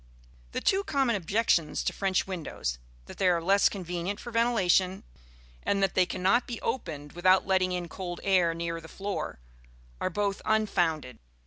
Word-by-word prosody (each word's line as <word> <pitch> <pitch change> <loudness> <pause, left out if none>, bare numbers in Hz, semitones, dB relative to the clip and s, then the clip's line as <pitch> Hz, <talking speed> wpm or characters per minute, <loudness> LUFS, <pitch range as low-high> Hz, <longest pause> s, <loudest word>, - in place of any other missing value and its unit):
The - - -2
two 390 +1 +2
common 270 - +1
objections 185 -4 +1
to - - -1
French 195 -2 0
windows 155 - -4 0.3
that - - -12
they 190 - +3
are 175 -1 +3
less 195 +4 +4
convenient 180 0 -4
for 240 - -8
ventilation, 195 -5 +2 0.6
and 200 -1 +1
that 195 - +1
they 185 -1 +3
cannot 195 +7 +1
be 240 -3 -5
opened 150 - -4
without 185 +2 +4
letting 185 -1 +2
in 180 -1 -2
cold 175 0 -6
air 180 -4 +3
near 165 0 -3
the 160 - -11
floor 200 - -4 0.6
are - - 0
both 200 +2 -1
unfounded. 175 - 0
185 Hz, 160 wpm, -28 LUFS, 170-200 Hz, 0.6 s, less